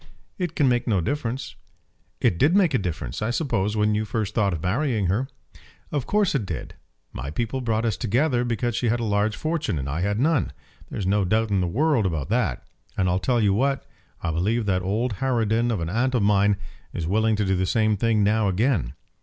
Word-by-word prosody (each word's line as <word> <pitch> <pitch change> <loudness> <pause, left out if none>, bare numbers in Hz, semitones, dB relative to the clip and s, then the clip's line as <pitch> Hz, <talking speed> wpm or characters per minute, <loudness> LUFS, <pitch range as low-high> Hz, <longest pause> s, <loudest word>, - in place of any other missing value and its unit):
"It 175 -3 -2
can 145 - +3
make 120 -1 +1
no 105 -5 +2
difference." 130 - -3 0.6
"It 85 - +1
did 155 +7 +4
make 185 -7 +4
a 130 - +3
difference, 80 -8 -4
I 105 - 0
suppose, 110 - 0
when 105 0 +2
you 105 +1 0
first 110 -1 -2
thought 100 -4 +2
of 80 -4 -4
marrying 110 +2 0
her?" 130 +6 -1 0.6
"Of 145 -4 -2
course 205 -3 +2
it 135 -6 0
did. 95 - -6 0.4
My 65 +4 -5
people 120 - -2
brought 115 -1 0
us 110 -4 0
together 125 +3 +1
because 120 0 -1
she 120 0 0
had 120 +2 +1
a - - -2
large 105 0 +1
fortune 155 - -2
and 65 -1 -3
I 75 +5 -2
had 100 +3 0
none. 140 - +1 0.4
There's 100 - -4
no 100 +2 +2
doubt 110 +3 +1
in 95 -2 +2
the 90 - 0
world 130 - +2
about 80 -4 -3
that. 105 - 0 0.3
And 95 - +2
I'll 90 +1 +1
tell 120 +3 +1
you 100 -3 +3
what; 135 +6 0 0.4
I 85 - 0
believe 105 +8 0
that 95 -2 +1
old 105 +4 -1
harridan 115 -2 +1
of 110 -5 0
an 85 -1 -3
aunt 130 +5 +1
of 115 - +2
mine 100 0 +3 0.4
is 85 - -3
willing 110 +5 +2
to 105 0 0
do 95 0 +1
the 95 0 0
same 110 0 +2
thing 110 0 +2
now 105 +1 +2
again. 95 - +1
110 Hz, 220 wpm, -24 LUFS, 95-125 Hz, 0.6 s, did